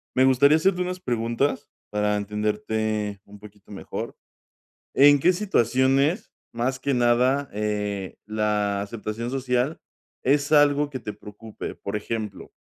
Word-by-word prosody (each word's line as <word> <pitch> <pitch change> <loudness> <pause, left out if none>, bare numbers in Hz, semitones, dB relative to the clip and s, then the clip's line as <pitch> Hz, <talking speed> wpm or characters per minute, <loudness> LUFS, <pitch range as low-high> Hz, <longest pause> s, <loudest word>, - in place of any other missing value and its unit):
Me 130 - +5
gustaría 140 +4 +5
hacerte 180 +2 +1
unas 180 0 -3
preguntas 120 0 -1 0.2
para 105 0 +1
entenderte 105 0 -2
un 105 +1 -14
poquito 105 -1 -15
mejor. 100 - -6 0.8
¿En 145 +1 +7
qué 180 +7 +4
situaciones, 140 - +1 0.2
más 125 +3 -1
que 140 -1 0
nada, 125 +3 +2
eh, 105 -2 -3
la 105 -2 0
aceptación 110 +2 -5
social 130 +2 -1 0.5
es 140 +2 +2
algo 145 0 +4
que 130 - -5
te 105 - -5
preocupe? 105 +1 -9
Por 100 +1 -5
ejemplo, 105 -1 -5
120 Hz, 130 wpm, -24 LUFS, 105-140 Hz, 0.8 s, En